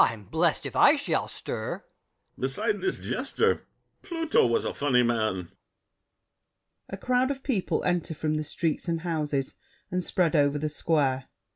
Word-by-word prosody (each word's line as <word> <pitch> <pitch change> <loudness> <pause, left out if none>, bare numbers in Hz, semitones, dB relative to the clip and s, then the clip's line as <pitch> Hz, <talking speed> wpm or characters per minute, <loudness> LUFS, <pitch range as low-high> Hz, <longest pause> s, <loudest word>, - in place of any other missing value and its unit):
I'm 115 -2 0
blessed 160 - +1
if - - -5
I 290 - +7
shall 285 -1 -1
stir! - - -5
BRICHANTEAU. - - -26
Beside 420 - -1
This 380 -1 0
jester - - 0 0.3
Pluto 330 - +2
was 115 - +1
a - - -1
funny 130 -4 +3
man! 110 -7 0 1.4
[A 195 - -5
crowd 250 +5 +1
of 270 -1 -4
people 220 -10 0
enter 175 -3 0
from 155 +1 -1
the 155 0 -1
streets 155 +2 -2
and 165 -1 -1
houses, 150 -5 -1 0.4
and 180 0 0
spread 175 -1 +1
over 145 -1 +3
the 155 +1 -1
Square. 145 -4 +1
160 Hz, 155 wpm, -27 LUFS, 140-195 Hz, 1.4 s, I